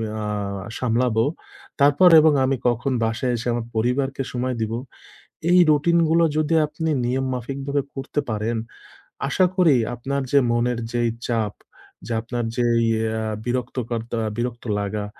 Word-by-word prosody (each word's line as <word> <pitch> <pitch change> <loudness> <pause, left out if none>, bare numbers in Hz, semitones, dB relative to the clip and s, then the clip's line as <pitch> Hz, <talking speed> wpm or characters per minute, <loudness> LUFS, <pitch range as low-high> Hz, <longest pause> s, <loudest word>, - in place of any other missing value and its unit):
অ্যাঁ 105 -2 -3 0.2
সামলাবো। 120 -2 +1 0.6
তারপর 145 +6 +6
এবং 155 -1 +5
আমি 135 +1 +1
কখন 125 +3 -1
বাসায় 115 +3 -1
এসে 120 - -5
আমার 120 -1 -2
পরিবারকে 135 +4 0
সময় 125 +1 -1
দিব। 110 0 -2 0.8
এই 180 - +6
রুটিন 155 +3 +3
গুলো 165 +1 +4
যদি 155 +1 +1
আপনি 155 +2 -3 0.2
নিয়ম 130 +2 0
মাফিকভাবে 140 +3 -2
করতে 135 +2 -3
পারেন, 110 +2 -1 0.7
আশা 185 +6 +3
করি 170 -6 +5 0.2
আপনার 140 +4 -3
যে, 140 - +6
মনের 120 0 0
যেই 120 -1 +1 0.2
চাপ 110 -4 -1 0.5
যে, - - -6
আপনার 120 +1 -3
যেই 120 -1 +2
এই 115 - +2 0.3
অ্যাঁ 110 -1 -2
বিরক্তকর্তা, 120 -2 -3 0.2
বিরক্ত 120 0 -3 0.2
লাগা 105 +1 -3
120 Hz, 140 wpm, -22 LUFS, 115-140 Hz, 0.8 s, তারপর